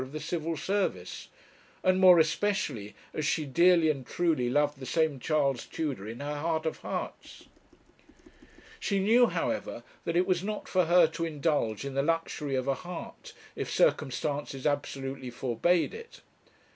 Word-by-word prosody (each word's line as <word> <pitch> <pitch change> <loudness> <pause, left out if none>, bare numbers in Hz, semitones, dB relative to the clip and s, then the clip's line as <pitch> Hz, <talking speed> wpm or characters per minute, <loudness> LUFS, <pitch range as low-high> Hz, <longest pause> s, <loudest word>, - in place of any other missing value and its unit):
of 130 +2 -7
the 155 - -4
Civil 165 0 -3
Service, 165 - -2 0.6
and 185 0 +3
more 185 -2 +8
especially 160 - 0 0.2
as 155 - -2
she 155 +1 0
dearly 170 +3 +4
and 135 -3 -6
truly 155 -4 0
loved 145 +1 +1
the 130 - -7
same 160 -4 +1
Charles 140 -3 0
Tudor 135 -11 -4
in 115 +4 -7
her 145 +1 -3
heart 160 0 -1
of 160 - -2
hearts. - - -6 1.3
She 200 - 0
knew, 230 +5 +5
however, - - -3 0.2
that 170 - -1
it 180 - +3
was 180 -1 +1
not 210 +1 -4
for 185 -2 +2
her 175 +1 +6
to 165 +1 -4
indulge 145 -8 -1
in 140 - -4
the 135 - +1
luxury 150 -2 -1
of 130 0 -1
a 135 - +3
heart, 175 +7 -8 0.2
if - - -4
circumstances 145 - 0
absolutely 135 -3 -2
forbade 130 - +1
it. 460 0 -11
155 Hz, 160 wpm, -29 LUFS, 135-175 Hz, 1.3 s, more